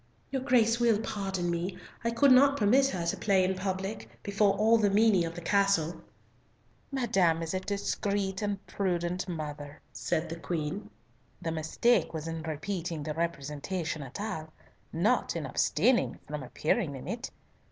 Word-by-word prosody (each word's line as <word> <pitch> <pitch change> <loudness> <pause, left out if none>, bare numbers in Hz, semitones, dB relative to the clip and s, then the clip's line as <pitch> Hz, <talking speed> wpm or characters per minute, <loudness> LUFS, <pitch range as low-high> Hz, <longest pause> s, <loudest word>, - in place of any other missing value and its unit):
"Your 265 -1 -1
Grace 235 -3 +3
will 230 -3 +3
pardon 195 -5 -2
me, 175 +2 -2 0.3
I 230 - +1
could 245 +4 +4
not 275 +2 +6
permit 255 +5 +4
her 180 -9 -3
to 170 - 0
play 195 -3 +3
in 185 +1 +1
public, 190 +2 -4
before 200 0 +2
all 220 +3 +4
the 205 -2 +3
menie 200 -3 +4
of 165 0 -5
the 175 - -6
castle." 195 -4 +2 0.9
"Madame 190 -11 +2
is 165 - -3
a 185 - 0
discreet 200 0 -2
and 205 -1 -2
prudent 180 -1 -1
mother," 150 -3 -6
said 160 +2 -1
the 165 +1 -6
Queen. 170 +3 -3 0.5
"The 165 - -3
mistake 160 +7 +1
was 160 0 -4
in 165 0 -4
repeating 165 +1 -4
the 155 0 -3
representation 155 +1 -3
at 135 +3 -8
all, 190 -7 -4 0.4
not 205 +10 +1
in - - -3
abstaining 250 -1 +2
from 150 0 -5
appearing 150 - -1
in 130 - -8
it. 235 +2 -4
190 Hz, 160 wpm, -30 LUFS, 165-210 Hz, 0.9 s, not